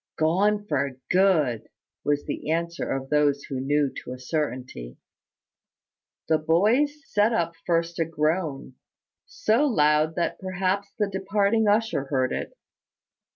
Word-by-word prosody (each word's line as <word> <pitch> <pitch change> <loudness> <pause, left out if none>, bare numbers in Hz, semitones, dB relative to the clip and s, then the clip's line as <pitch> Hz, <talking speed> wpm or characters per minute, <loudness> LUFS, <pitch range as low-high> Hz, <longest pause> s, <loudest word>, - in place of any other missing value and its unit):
"Gone 200 +6 +2
for 140 -6 -1
good," 165 - +2 0.3
was 145 0 0
the - - -5
answer 170 +1 -2
of 135 +1 -3
those 145 -1 +2
who 135 - -5
knew 145 +1 +1
to 125 - -7
a 125 - -9
certainty. 130 - -4 1.3
The 160 -1 +3
boys 230 - +2
set 210 +2 +2
up 170 -5 0
first 170 0 0
a 165 - +2
groan, 155 -3 -2 0.5
so 245 -5 +1
loud 155 - +2
that 170 - -1
perhaps 190 +1 -1
the 210 -2 +1
departing 200 +3 +1
usher 210 -9 +1
heard 130 -2 0
it. - - -5
165 Hz, 130 wpm, -25 LUFS, 145-200 Hz, 1.3 s, The